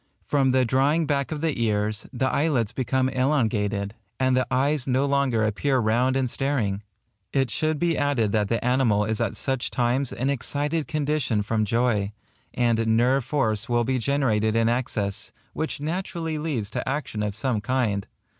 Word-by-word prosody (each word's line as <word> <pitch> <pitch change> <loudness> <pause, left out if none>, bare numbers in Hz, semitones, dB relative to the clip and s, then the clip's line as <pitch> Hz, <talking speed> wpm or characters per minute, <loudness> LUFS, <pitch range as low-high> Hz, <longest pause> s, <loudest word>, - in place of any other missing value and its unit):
From 140 -2 +2
the 130 0 +3
drawing 140 +7 +2
back 140 -1 -1
of 150 -2 -3
the 155 -7 -1
ears, 105 -1 -1
the 130 0 -1
eyelids 130 -6 +1
become 130 +1 0
elongated, 110 -7 0 0.3
and 130 -1 +3
the 130 -1 +1
eyes 140 +1 +1
no 130 +2 +2
longer 140 -5 +1
appear 120 +6 +1
round 120 +3 +2
and 130 -1 +1
staring. 120 -7 -1 0.5
It 135 -4 +1
should 155 +4 0
be 170 +1 +1
added 140 -8 +1
that 105 -1 +1
the 115 0 -1
animal 125 -5 +2
is 110 +1 -1
at 115 -4 -1
such 135 -2 -2
times 125 +2 0
in - - -8
an 130 +3 0
excited 145 +4 -1
condition 145 -8 0
from 110 +1 0
joy; 110 -3 +1 0.4
and 115 -2 +2
nerve 130 +3 +3
force 115 -5 -1
will 120 0 +2
be 130 +2 0
generated 115 -5 +1
in 115 0 +3
excess, 105 -4 -1 0.2
which 160 -2 -3
naturally 165 0 -3
leads 130 -10 -3
to - - -3
action 135 -6 -3
of 105 -1 -2
some 120 -2 -1
kind. 105 -4 0
125 Hz, 175 wpm, -25 LUFS, 110-140 Hz, 0.5 s, the